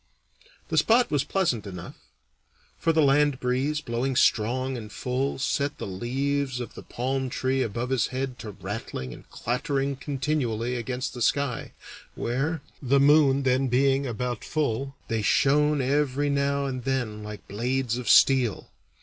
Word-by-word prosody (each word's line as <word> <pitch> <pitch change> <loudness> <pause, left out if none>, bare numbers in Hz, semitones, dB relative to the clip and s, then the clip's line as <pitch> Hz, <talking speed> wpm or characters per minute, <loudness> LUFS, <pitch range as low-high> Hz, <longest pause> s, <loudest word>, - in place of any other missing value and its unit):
The - - +3
spot 240 +2 +3
was 145 -2 +2
pleasant 135 - 0
enough; 90 -3 -7 0.8
for 165 - +1
the 160 -1 +3
land 145 -1 +3
breeze, 135 +5 0
blowing 125 +2 -2
strong 130 +4 +2
and 110 -3 -7
full, 130 +4 -2
set 140 +2 -1
the - - -5
leaves 130 +6 -2
of 120 - -6
the - - -9
palm 130 +2 -2
tree 130 +1 0
above 120 +2 -2
his 130 -3 +2
head 130 -1 -4
to 110 - -7
rattling 95 - -6
and - - -14
clattering 135 +2 -1
continually 130 -4 -2
against 125 +2 -3
the 125 - -7
sky, 135 +2 0 0.4
where, 140 +6 -2 0.2
the 140 0 +3
moon 140 -1 +5
then 130 +1 +2
being 135 +2 +2
about 120 0 -3
full, 135 -2 -2
they 115 -1 -1
shone 145 +6 +3
every 145 +1 +1
now 140 0 +1
and 130 -2 -4
then 125 -5 -2
like 105 0 -8
blades 125 +3 -1
of 125 - -4
steel. 130 -6 +4
130 Hz, 150 wpm, -26 LUFS, 120-140 Hz, 0.8 s, moon